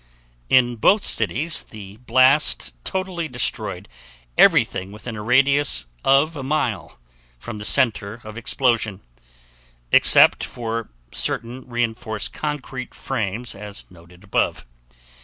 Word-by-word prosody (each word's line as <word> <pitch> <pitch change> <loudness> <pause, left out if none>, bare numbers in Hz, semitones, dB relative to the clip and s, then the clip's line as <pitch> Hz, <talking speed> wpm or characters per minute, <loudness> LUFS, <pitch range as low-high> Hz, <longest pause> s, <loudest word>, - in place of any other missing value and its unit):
In 120 -2 +3
both 200 - +3
cities 120 - +2
the 100 -2 -12
blast 130 - +3
totally 185 -3 -3
destroyed 105 -7 -3 0.5
everything 95 +1 +3
within 110 +2 -8
a 105 - -6
radius 135 - +2 0.2
of 140 +4 +3
1 140 - -6
mile 135 - -2 0.4
from 110 - -8
the 105 - -6
center 110 -4 +2
of 110 0 -10
explosion, 115 -3 0 0.9
except - - +6
for 115 -1 -5 0.2
certain 125 +2 -2
reinforced 120 -2 -3
concrete 135 -4 -5
frames 110 +4 -3
as 105 0 -8
noted 90 +1 -18
above. 100 - -1
120 Hz, 110 wpm, -21 LUFS, 105-135 Hz, 0.9 s, except